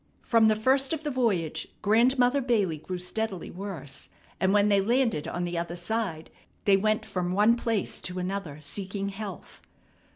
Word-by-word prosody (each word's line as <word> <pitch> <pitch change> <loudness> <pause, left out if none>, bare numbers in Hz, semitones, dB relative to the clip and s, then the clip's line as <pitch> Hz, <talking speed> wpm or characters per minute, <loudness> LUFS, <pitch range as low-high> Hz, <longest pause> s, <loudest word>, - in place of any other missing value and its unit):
From 225 -2 +4
the 215 - +4
first 265 +6 +2
of 315 -1 -3
the 300 - -2
voyage 210 - 0 0.2
Grandmother 245 +5 +4
Bailey 205 - +1
grew 180 +4 -5
steadily 190 +1 -3
worse, 175 -8 -7 0.3
and 190 - +2
when 205 0 +4
they 200 -1 +4
landed 230 - +1
on 175 - -3
the 175 -1 -2
other 170 0 -4
side 175 -3 -3 0.3
they 200 - +6
went 215 +2 +1
from 180 -1 -2
one 210 +4 +5
place 230 -4 -1
to 180 0 -5
another 180 -5 -3
seeking 195 +6 -3
health. 190 - -8
200 Hz, 165 wpm, -27 LUFS, 180-225 Hz, 0.3 s, they